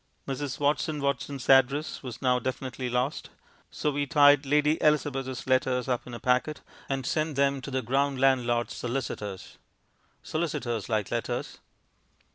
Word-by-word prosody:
Mrs. 135 0 -4
Watson 150 +1 0
Watson's 140 -1 -2
address 135 +3 +3
was 125 0 -8
now 125 -1 +3
definitely 130 0 -4
lost, 125 +4 -1 0.4
so 150 - -1
we 145 0 -1
tied 145 0 +5
Lady 150 +2 +2
Elizabeth's 135 -4 0
letters 130 -1 +1
up 125 -1 -1
in 120 - -7
a - - -7
packet 125 +6 0 0.3
and 135 -2 -2
sent 155 0 -1
them 140 0 +2
to 140 - -7
the 130 -1 -2
ground 135 +1 0
landlord's 120 -3 +2
solicitors. 115 -6 -5 0.6
Solicitors 120 - -2
like 110 -3 -1
letters. - - -3
135 Hz, 140 wpm, -28 LUFS, 125-145 Hz, 0.6 s, tied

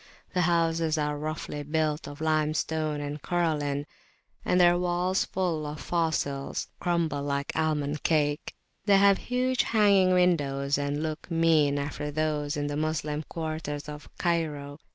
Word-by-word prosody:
The 180 - +2
houses 165 -2 +2
are 150 -1 0
roughly 150 0 -4
built 155 +1 -1
of 145 +1 -9
limestone 155 -1 0
and 145 0 -5
coralline, 150 -5 0 0.6
and 180 - +2
their 175 -1 +6
walls 180 +1 +1
full 170 -5 -1
of 150 0 -6
fossils 155 -5 -1
crumble 170 -5 0
like 140 0 -2
almond 150 -2 0
cake; 150 -2 0 0.3
they 200 -2 +6
have 200 0 +5
huge 255 +1 0
[p.227] 225 - 0
hanging 195 -3 +5
windows, 145 -6 +2
and 145 +1 -1
look 155 +1 -4
mean 160 -4 +3
after 145 +1 -3
those 150 -1 -1
in 145 - -1
the 145 0 -2
Moslem 155 -1 -1
quarters 155 -3 -4
of 150 0 -8
Cairo. 150 -4 -1
155 Hz, 145 wpm, -28 LUFS, 145-170 Hz, 0.6 s, their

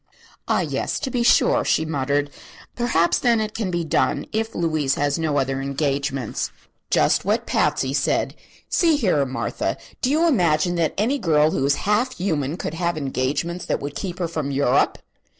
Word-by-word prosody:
"Ah, - - +2
yes; - - -2
to 270 -3 -3
be 245 - 0
sure," 235 - +4
she 160 - +1
muttered. 145 -1 -1 0.4
"Perhaps, 230 -9 +2
then, 235 -2 +3
it 215 -1 -2
can 215 -5 -2
be 175 -1 -1
done, 160 - 0
if 220 +1 -2
Louise, 155 -5 0
has 145 +1 0
no 155 -3 0
other 135 0 0
engagements." 135 - -2 0.4
"Just - - +3
what - - 0
Patsy 135 0 +1
said. - - 0 0.3
See 330 -3 +3
here, 185 - +2
Martha, 130 - -2 0.2
do 255 - +1
you 320 +4 +3
imagine 175 - +2
that 165 -2 0
any 245 +8 +1
girl 155 -4 +3
who - - -1
is 140 - +3
half 215 +5 +1
human 160 -5 -1
could 155 - -4
have 170 0 -1
engagements 145 +5 -2
that - - 0
would 145 +1 -6
keep 185 -3 -4
her 175 -2 -1
from 155 -4 -3
Europe?" 140 -2 +2
160 Hz, 175 wpm, -22 LUFS, 140-205 Hz, 0.4 s, sure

